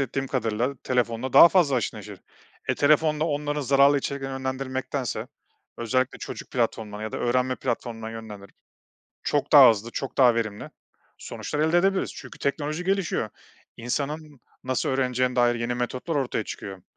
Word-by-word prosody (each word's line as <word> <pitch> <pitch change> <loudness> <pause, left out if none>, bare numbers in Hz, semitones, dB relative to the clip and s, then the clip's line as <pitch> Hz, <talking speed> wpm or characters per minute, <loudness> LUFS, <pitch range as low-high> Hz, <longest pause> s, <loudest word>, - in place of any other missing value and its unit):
ettiğim 135 0 -2
kadarıyla 120 +1 -1
telefonla 125 0 -1
daha 170 - +10
fazla 160 -8 +3
haşır 120 - -2
neşir. - - -10 0.5
E, - - +2
telefonla 155 +1 +3
onları 145 -1 -2
zararlı 140 +1 +4
içeriklere 135 0 -4
yönlendirmektense 130 -1 -3 0.5
özellikle 130 +2 0
çocuk - - -8
platformuna 110 -3 -2
ya 110 - -5
da - - -3
öğrenme 125 +1 0
platformuna 115 -3 -4
yönlendirerek 105 -3 -10 0.7
çok - - -1
daha - - +10
hızlı, 110 +2 -3
çok 135 +2 -5
daha 125 -3 +6
verimli 110 -3 -3 0.5
sonuçlar 150 - -5
elde 160 +3 +3
edebiliriz. 195 +1 +1
Çünkü - - -11
teknoloji 150 +4 -2
gelişiyor. 190 - 0 0.5
İnsanın 145 +4 -4 0.2
nasıl 130 0 -1
öğreneceğine 125 -1 0
dair 120 -1 +4
yeni 120 +1 -2
metotlar 125 +6 -3
ortaya 125 -5 -1
çıkıyor. 95 -2 -8
130 Hz, 145 wpm, -25 LUFS, 115-145 Hz, 0.7 s, daha